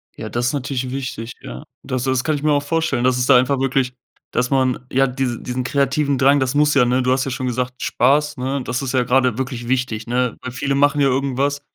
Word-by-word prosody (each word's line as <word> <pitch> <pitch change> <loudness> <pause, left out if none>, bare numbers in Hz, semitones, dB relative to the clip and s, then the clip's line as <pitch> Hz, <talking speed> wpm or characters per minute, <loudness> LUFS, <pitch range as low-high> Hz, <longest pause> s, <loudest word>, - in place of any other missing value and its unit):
Ja, 110 - -7
das 120 +2 -1
ist - - -1
natürlich 130 -2 -3
wichtig, 125 -3 -5
ja. 65 +1 -8 0.2
Das 130 -1 -3
das 130 -1 0
kann 155 +2 0
ich 145 - -5
mir 155 - +3
auch 145 -1 +2
vorstellen, 145 -5 0
dass 130 0 +2
es 125 - +1
da 130 -1 +6
einfach 130 +2 +1
wirklich 135 -1 0 0.4
dass 125 +1 0
man, 130 -2 0
ja, 135 +1 +3
diesen 125 -2 -3
diesen 125 +1 -3
kreativen 140 +1 0
Drang, 140 +2 +4
das 130 0 0
muss 150 +1 +3
ja, 135 -3 +5
ne? 125 +2 +2
Du 125 0 +2
hast 130 0 0
ja 135 - -3
schon 130 +1 -3
gesagt, 125 +1 -3
Spaß, 150 +4 +2
ne, 135 +1 -2
das 125 +1 -3
ist 135 -1 -3
ja 130 - +2
gerade 125 -1 +2
wirklich 125 -2 -4
wichtig, 125 -4 -1
ne? 125 0 0
Weil 125 - -6
viele 140 +2 -2
machen 145 +1 +3
ja 140 - +4
irgendwas, 140 +2 0
130 Hz, 245 wpm, -20 LUFS, 125-140 Hz, 0.4 s, da